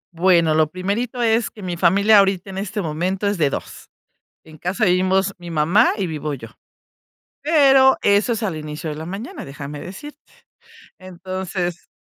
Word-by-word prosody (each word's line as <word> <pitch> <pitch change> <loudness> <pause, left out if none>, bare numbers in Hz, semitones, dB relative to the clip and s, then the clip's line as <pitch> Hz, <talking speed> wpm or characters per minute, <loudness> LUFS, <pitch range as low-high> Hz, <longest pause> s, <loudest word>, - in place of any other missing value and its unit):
Bueno, 170 -2 +3
lo 155 -1 +2
primerito 220 +7 -3
es 225 0 +2
que 210 - -13
mi 175 -1 -3
familia 200 +5 +5
ahorita 195 -1 +1
en 190 - -5
este 205 0 -4
momento 180 +6 -2
es 200 -3 0
de 145 - +3
2, - - -7 0.5
en 155 -1 -15
casa 185 +8 -2
vivimos 190 +1 +2
mi 175 -1 -9
mamá 165 +9 +3
y 195 - -1
vivo 155 -2 -4
yo. 115 -4 -8 0.9
Pero, 270 -4 +5
eso 205 +4 +3
es 225 - -5
al 185 -7 -2
inicio 155 +1 -6
de 150 - -6
la 160 +1 -7
mañana, 200 +7 -7
déjame 140 +1 -8
decirte. 295 +12 -10 0.8
Entonces, 185 -1 -5
185 Hz, 165 wpm, -20 LUFS, 165-205 Hz, 0.9 s, familia